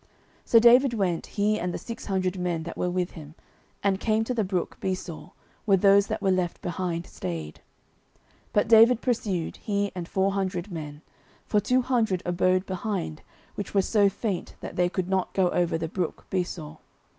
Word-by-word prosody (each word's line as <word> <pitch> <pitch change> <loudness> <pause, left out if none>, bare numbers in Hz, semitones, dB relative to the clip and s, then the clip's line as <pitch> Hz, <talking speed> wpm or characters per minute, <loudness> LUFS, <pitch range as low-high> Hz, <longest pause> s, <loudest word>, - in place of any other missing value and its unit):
09:030:009 - - -34 0.4
So 230 - +6
David 240 +3 +6
went, 185 -6 0
he 210 +1 0
and 180 - -2
the - - -3
six 230 - -8
hundred 185 -2 -1
men 175 -2 -1
that 170 - -7
were 180 - -1
with 180 0 -1
him, 155 -2 -11 0.5
and 195 -1 +2
came 220 0 +1
to 250 - -2
the 225 -3 0
brook 185 -2 -3
Besor, 185 -3 -4 0.4
where 195 -3 +5
those 200 +1 +5
that - - -3
were 195 - +3
left 180 -2 0
behind 175 -1 -3
stayed. 80 -3 -6 0.9
09:030:010 - - -35
But 205 - +3
David 230 +2 +6
pursued, 205 -9 -1
he 200 -1 -1
and 175 -2 -5
four 195 +2 +1
hundred 190 -1 -2
men: 150 -2 -7 0.4
for 210 - +2
two 250 +5 +2
hundred 225 -8 +1
abode 185 +1 +2
behind, 185 -4 -3 0.3
which 200 0 -6
were 195 - +4
so 205 -1 +3
faint 195 -1 -4
that - - -8
they 180 0 +2
could 185 -1 -2
not 190 -1 -1
go 185 -2 +3
over 175 -2 +1
the 165 0 -3
brook 175 0 -4
Besor. 170 -4 -3
185 Hz, 190 wpm, -26 LUFS, 175-205 Hz, 0.9 s, So